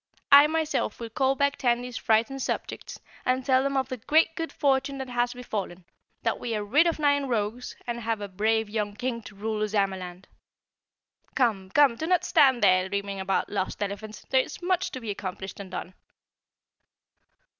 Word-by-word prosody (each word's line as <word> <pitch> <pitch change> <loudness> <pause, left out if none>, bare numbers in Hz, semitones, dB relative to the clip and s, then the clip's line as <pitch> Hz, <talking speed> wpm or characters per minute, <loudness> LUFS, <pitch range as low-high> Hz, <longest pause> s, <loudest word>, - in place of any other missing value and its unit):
I 285 +1 +9
myself 315 0 -1
will 230 -1 -6
call 265 +3 +1
back 280 +1 +1
Tandy's 245 0 0
frightened 230 +5 +1
subjects - - -4 0.2
and 255 0 0
tell 260 -1 +4
them 275 0 0
of 260 -2 0
the 255 - -4
great 320 +7 +2
good 325 0 -4
fortune 275 -1 +1
that 265 -1 -5
has 245 0 0
befallen, 200 -7 -5 0.4
that - - 0
we 230 -2 -3
are 210 - -2
rid 295 +11 +4
of 335 - 0
nine 285 -2 +2
rogues 230 +1 -2
and 235 -1 -3
have 225 -1 -1
a 205 - -5
brave 220 +3 0
young 205 -1 -3
King 245 0 -3
to 210 - -12
rule 215 +1 -3
Ozamaland. 190 -3 -2 1.1
Come, 210 -7 +1
come, 275 0 +4
do 320 - -3
not 360 -1 +3
stand 260 -4 +4
here 185 0 +4
dreaming 200 0 -3
about 190 0 -1
lost 200 0 -2
elephants; 205 +2 -6
there 265 - +5
is - - -8
much 365 +1 +1
to 260 - -6
be 225 -4 -4
accomplished 190 -1 -6
and 195 -2 -8
done." 185 0 -6
235 Hz, 180 wpm, -27 LUFS, 205-270 Hz, 1.1 s, I